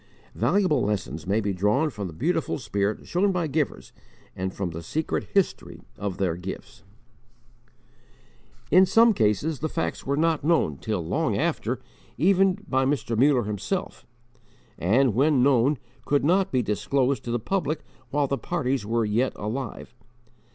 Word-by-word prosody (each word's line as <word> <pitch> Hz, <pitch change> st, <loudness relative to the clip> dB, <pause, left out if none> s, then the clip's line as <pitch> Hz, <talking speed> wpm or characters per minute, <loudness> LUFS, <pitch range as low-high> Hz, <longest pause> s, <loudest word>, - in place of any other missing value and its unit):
Valuable 185 Hz, -10 st, +2 dB
lessons 90 Hz, -, -3 dB
may 100 Hz, +3 st, +2 dB
be 100 Hz, -2 st, -1 dB
drawn 105 Hz, -, +1 dB
from 105 Hz, -4 st, -5 dB
the 85 Hz, -, -9 dB
beautiful 160 Hz, -, -1 dB
spirit 105 Hz, -4 st, -2 dB
shown 195 Hz, +3 st, +1 dB
by 180 Hz, -3 st, 0 dB
givers 150 Hz, -1 st, -2 dB, 0.4 s
and 95 Hz, 0 st, -3 dB
from 95 Hz, -2 st, -4 dB
the 80 Hz, +1 st, -6 dB
secret 155 Hz, -, -2 dB
history 195 Hz, -2 st, 0 dB
of 100 Hz, -3 st, -4 dB
their 90 Hz, -4 st, 0 dB
gifts. 95 Hz, +5 st, -8 dB, 1.9 s
In 185 Hz, +4 st, +7 dB
some 225 Hz, +4 st, +5 dB
cases 135 Hz, -, +1 dB
the 155 Hz, -, -2 dB
facts 85 Hz, -, -3 dB
were 140 Hz, +1 st, -1 dB
not 160 Hz, -1 st, +1 dB
known 150 Hz, -, +2 dB
till -, -, -3 dB
long -, -, 0 dB
after, -, -, -1 dB, 0.4 s
even 190 Hz, +1 st, +3 dB
by 130 Hz, 0 st, +1 dB
Mr. 135 Hz, -4 st, 0 dB
Muller 130 Hz, +1 st, +4 dB
himself; 105 Hz, -, -4 dB, 0.7 s
and 115 Hz, +7 st, +3 dB
when 135 Hz, +2 st, +3 dB
known, 135 Hz, +1 st, +3 dB, 0.3 s
could 145 Hz, -1 st, +1 dB
not 185 Hz, +4 st, +2 dB
be 130 Hz, -2 st, +1 dB
disclosed 130 Hz, +6 st, 0 dB
to -, -, -5 dB
the 120 Hz, -, +1 dB
public 155 Hz, -, -2 dB, 0.3 s
while 145 Hz, +2 st, +1 dB
the 140 Hz, 0 st, -2 dB
parties 135 Hz, -8 st, -1 dB
were 115 Hz, 0 st, +1 dB
yet 115 Hz, +5 st, +1 dB
alive. 120 Hz, +5 st, -5 dB
130 Hz, 150 wpm, -25 LUFS, 105-155 Hz, 1.9 s, In